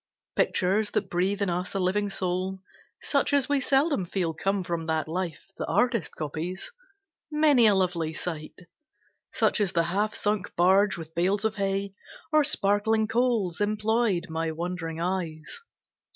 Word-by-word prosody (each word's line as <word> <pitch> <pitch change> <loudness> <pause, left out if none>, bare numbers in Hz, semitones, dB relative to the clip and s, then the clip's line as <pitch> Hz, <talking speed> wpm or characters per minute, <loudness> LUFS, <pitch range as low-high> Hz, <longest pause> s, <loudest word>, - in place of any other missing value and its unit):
Pictures 205 +3 +2
that 195 - -2
breathe 195 +4 0
in 190 - 0
us 180 +2 -3
a - - +1
living 195 +3 0
soul, 185 0 -2 0.4
Such 280 0 +1
as 280 -2 +3
we 285 -1 +2
seldom 275 - +2
feel 175 -2 -2
come 195 +4 -1
from 170 -2 -3
that 160 -1 0
life 175 +2 -4
The - - -3
artist 235 - +1
copies. 160 +5 -5 0.6
Many 300 -6 +5
a 205 - +5
lovely 175 -4 0
sight 160 -1 -6 0.7
Such - - +2
as 195 -3 0
the 170 - +3
half 210 +2 0
sunk 210 -2 -1
barge 190 +3 +4
with 160 -1 -9
bales 190 +5 +1
of 220 0 -1
hay, 195 0 -1 0.4
Or 310 -1 +5
sparkling 220 -4 +2
coals 225 -6 0
employed 215 -2 +1
my 160 0 -2
wondering 165 0 -4
eyes. 170 - -3
190 Hz, 150 wpm, -27 LUFS, 175-215 Hz, 0.7 s, Many